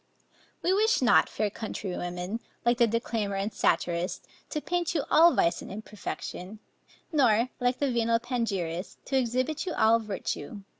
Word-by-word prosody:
We 365 Hz, -, +3 dB
wish 440 Hz, +4 st, +3 dB
not, 240 Hz, -, +5 dB
fair 210 Hz, -1 st, -1 dB
countrywomen, 180 Hz, -2 st, -4 dB, 0.3 s
like 240 Hz, +1 st, +3 dB
the 235 Hz, -, +6 dB
declaimer 225 Hz, -2 st, -1 dB
and 195 Hz, +2 st, -2 dB
satirist, 175 Hz, +1 st, 0 dB, 0.2 s
to 305 Hz, -, -2 dB
paint 350 Hz, +2 st, -1 dB
you 295 Hz, -, +1 dB
all 335 Hz, +2 st, +7 dB
vice 170 Hz, -, +2 dB
and -, -, -9 dB
imperfection, 210 Hz, -1 st, -6 dB, 0.5 s
nor, 245 Hz, -6 st, +3 dB
like 245 Hz, 0 st, +1 dB
the 280 Hz, -2 st, 0 dB
venal 230 Hz, -1 st, +2 dB
panegyrist, 205 Hz, -8 st, -3 dB
to 270 Hz, -, -2 dB
exhibit 255 Hz, +7 st, 0 dB
you 350 Hz, -, -1 dB
all 225 Hz, +1 st, +4 dB
virtue. 205 Hz, -3 st, -5 dB
230 Hz, 150 wpm, -28 LUFS, 200-260 Hz, 0.5 s, all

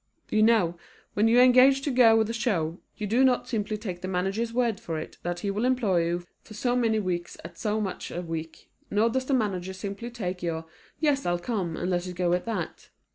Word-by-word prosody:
You 215 Hz, -, +3 dB
know, 210 Hz, -7 st, +3 dB, 0.3 s
when 210 Hz, +2 st, +3 dB
you 235 Hz, +2 st, +5 dB
engage 255 Hz, +2 st, +6 dB
to 285 Hz, -, 0 dB
go 240 Hz, -3 st, +6 dB
with 220 Hz, -1 st, +2 dB
a 230 Hz, -, -3 dB
show, 185 Hz, -8 st, -1 dB, 0.2 s
you 210 Hz, -, -3 dB
do 235 Hz, +6 st, +3 dB
not 255 Hz, -2 st, +3 dB
simply 215 Hz, -2 st, -2 dB
take 185 Hz, -5 st, -6 dB
the 185 Hz, -, -4 dB
manager's 195 Hz, +5 st, -1 dB
word 235 Hz, -3 st, 0 dB
for 165 Hz, -2 st, -4 dB
it 155 Hz, -, -7 dB
that 175 Hz, 0 st, -3 dB
he 200 Hz, -, -1 dB
will 205 Hz, +3 st, -2 dB
employ 220 Hz, -10 st, +2 dB
you 175 Hz, +1 st, -2 dB, 0.2 s
for 215 Hz, -, -13 dB
so 245 Hz, +3 st, 0 dB
many 230 Hz, -3 st, +2 dB
weeks 175 Hz, -3 st, -3 dB
at 170 Hz, 0 st, -9 dB
so 215 Hz, 0 st, 0 dB
much 195 Hz, -3 st, -4 dB
a 175 Hz, -, -4 dB
week, 165 Hz, -1 st, -7 dB, 0.2 s
nor 220 Hz, +3 st, +2 dB
does 260 Hz, +2 st, -1 dB
the 275 Hz, -, +1 dB
manager 190 Hz, -6 st, -1 dB
simply 200 Hz, +5 st, -6 dB
take 185 Hz, -7 st, -4 dB
your 165 Hz, -2 st, -3 dB, 0.3 s
"Yes, 290 Hz, -3 st, +2 dB
I'll 175 Hz, 0 st, +2 dB
come," 175 Hz, -4 st, -3 dB
and 180 Hz, -, -2 dB
let 175 Hz, 0 st, -1 dB
it 180 Hz, -, -6 dB
go 175 Hz, -1 st, +1 dB
at 180 Hz, -, 0 dB
that. 210 Hz, -8 st, -4 dB
205 Hz, 230 wpm, -27 LUFS, 175-235 Hz, 0.3 s, engage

